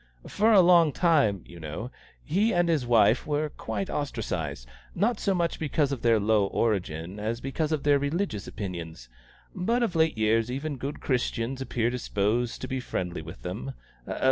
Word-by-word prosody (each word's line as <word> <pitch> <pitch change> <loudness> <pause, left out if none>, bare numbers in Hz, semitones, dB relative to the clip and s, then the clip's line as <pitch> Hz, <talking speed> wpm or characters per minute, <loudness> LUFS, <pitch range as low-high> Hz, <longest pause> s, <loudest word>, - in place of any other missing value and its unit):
For 220 +3 +2
a 200 -4 +8
long 170 -3 +6
time, 145 - +2
you 85 - -12
know, 80 - -6 0.3
he 200 +8 +1
and 175 0 +3
his 155 -7 +1
wife 115 +1 +4
were 150 0 0
quite 105 -7 -4
ostracised 80 - -3 0.3
not 215 +4 +1
so 195 -2 +1
much 170 -1 -1
because 150 -2 0
of 135 - -3
their 115 -2 +4
low 105 -1 +3
origin 95 -4 -1
as 110 +3 -2
because 145 +4 -2
of 155 -3 -1
their 145 -1 +4
religious 145 - -2
opinions. 85 - -6 0.4
But 230 +7 0
of 190 -7 -1
late 160 -5 +2
years 110 +1 +2
even 140 +3 -3
good 140 +3 -5
Christians 125 0 -1
appear 120 -3 0
disposed 120 0 -1
to 130 - -4
be 130 0 -2
friendly 90 -8 -4
with 80 +4 -10
them. 105 +9 -5
125 Hz, 170 wpm, -27 LUFS, 105-155 Hz, 0.4 s, a